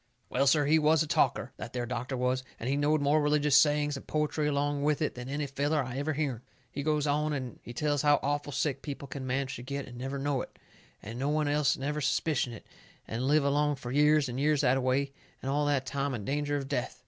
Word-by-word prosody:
Well, 135 +2 +1
sir, 145 +1 +4
he 155 +3 +4
was 155 +1 +4
a - - -6
talker, - - +1
that - - -7
there 125 -1 -2
doctor 125 +2 -3
was, 125 +1 0 0.2
and 115 - -4
he 135 - +1
knowed 145 +1 +2
more 145 +2 +3
religious 150 -1 +3
sayings 150 +1 +4
and 135 - -9
poetry 150 0 0
along 145 0 0
with 150 0 +1
it, 155 - 0
than 125 +1 -7
any 145 +1 -2
feller 145 +2 0
I 130 +1 -5
ever 155 +2 -1
hearn. 140 -6 -2 0.3
He 140 - -4
goes 150 0 +1
on 150 +1 +1
and 130 -4 -5
he - - -9
tells 145 +2 0
how 145 -1 +4
awful 145 +1 -1
sick 140 0 -1
people 140 -1 -6
can 130 0 -6
manage 130 +1 -1
to - - -8
get 140 +2 -4
and 120 -1 -10
never 135 +2 -3
know 140 -1 0
it, - - -10 0.5
and 115 +4 -7
no 140 +2 0
one 150 0 +1
else 145 -1 +2
never 150 +3 -2
suspicion 140 -3 0
it, 115 - -10 0.4
and 120 +4 -2
live 150 +1 +4
along 145 +1 +2
fur 125 -3 -7
years 150 +1 +4
and 125 +1 -4
years 150 0 +2
that 130 -2 +3
a 135 - 0
way, 135 +2 0 0.3
and 135 - -3
all 145 +1 +1
the 145 -2 +3
time 140 +1 -2
in 105 -4 -6
danger 145 +1 -1
of 135 -1 -4
death. 125 -2 -3
140 Hz, 245 wpm, -30 LUFS, 130-150 Hz, 0.5 s, sir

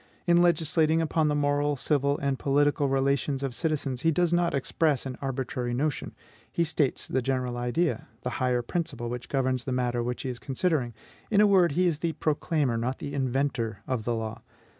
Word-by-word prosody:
In 175 0 +5
legislating 160 -1 +3
upon 160 -1 +1
the 150 - +1
moral, 145 0 +1
civil, 140 +1 +1
and 140 -2 -1
political 145 0 +2
relations 135 +1 +1
of 135 -2 -2
citizens, 140 -4 -1
he 165 - +3
does 175 +1 +2
not 175 -2 +2
express 140 +1 0
an 130 -1 -4
arbitrary 130 -2 -2
notion: 145 +2 -2 0.4
he 170 - +1
states 150 -4 0
the 130 - 0
general 125 -1 -1
idea, 120 +2 -1 0.2
the 125 - -2
higher 125 -1 +1
principle 135 -5 -3
which 125 0 -6
governs 130 -2 0
the 135 - -3
matter 125 -1 0
which 125 +1 -3
he 130 - -3
is 125 -1 -5
considering; 135 - -1 0.3
in 205 - +3
a 210 - +7
word, 185 -6 +4
he 180 +4 +2
is 165 -4 +1
the 165 -1 -1
proclaimer, 150 -5 0
not 125 +3 -2
the 140 - -6
inventor, 130 -6 -1
of 130 -4 -2
the 120 +1 -1
law. 110 -1 -4
140 Hz, 190 wpm, -27 LUFS, 125-155 Hz, 0.4 s, a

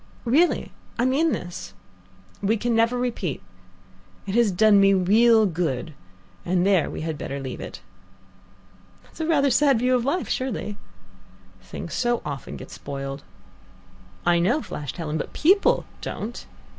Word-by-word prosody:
Really. 305 +9 +2 0.3
I 240 - +2
mean 295 +5 +2
this. 95 - -6 0.7
We 210 +3 +2
can 240 +2 -1
never 230 +2 +2
repeat. 230 - -2 0.9
It 195 - -4
has 235 -1 +4
done 205 +2 +5
me 195 0 +5
real 220 +4 +5
good, 160 -5 -2 0.5
and 180 0 +1
there 195 -5 +3
we - - -6
had 160 -1 -4
better 140 - -4
leave 130 -2 -6
it." - - -8 1.2
"That's - - -11
rather 310 -3 +3
a - - 0
sad 275 0 +4
view 250 +2 +2
of 250 -2 +2
life, 325 +7 -1
surely." 215 -5 -3 0.9
"Things 95 - -8
so 240 -1 0
often 140 -3 -6
get - - -10
spoiled." 140 0 -6 1.0
"I 175 0 +4
know," 240 - +1
flashed 145 +1 -6
Helen, 160 -2 -3
"but - - -5
people 380 +6 +3 0.2
don't." 230 +3 -6
210 Hz, 145 wpm, -24 LUFS, 165-245 Hz, 1.2 s, done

